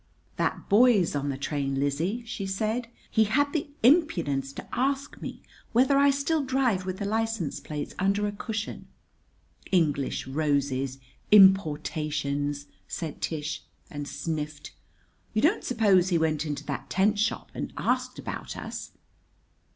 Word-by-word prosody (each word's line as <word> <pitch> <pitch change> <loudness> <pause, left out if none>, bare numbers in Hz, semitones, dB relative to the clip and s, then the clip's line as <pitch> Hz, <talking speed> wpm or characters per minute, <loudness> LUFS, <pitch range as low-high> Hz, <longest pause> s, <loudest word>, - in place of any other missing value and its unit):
"That - - -1
boy's 210 -6 +5
on 145 0 -1
the 135 - -2
train, 140 -1 -2
Lizzie!" 160 - -1
she 220 -4 -4
said. 220 +5 -1 0.2
"He 220 -1 +4
had 285 +7 +1
the 300 -3 -1
impudence 170 - +3
to - - -8
ask 275 +2 -1
me - - -7 0.3
whether 260 +4 +4
I 280 0 +6
still 280 +2 +1
drive 255 -8 +1
with 185 0 -3
the 200 - -3
license 220 -5 -1
plates 150 -1 -5
under 200 +2 +2
a 205 - -1
cushion. 215 +1 -5 0.8
English 150 -7 +1
roses 135 -2 0 0.3
importations!" 150 -7 +3 0.2
said 160 -4 -5
Tish, 155 -1 -3 0.3
and 145 -1 -5
sniffed. 150 -2 -4 0.6
"You 215 - +2
don't 345 +8 +3
suppose 200 -7 +3
he 175 - +3
went 160 -1 0
into 145 -1 -4
that 140 - -5
tent 205 +2 +2
shop 215 - -1
and - - -4
asked - - 0
about - - -6
us?" - - -7
185 Hz, 140 wpm, -27 LUFS, 145-225 Hz, 0.8 s, I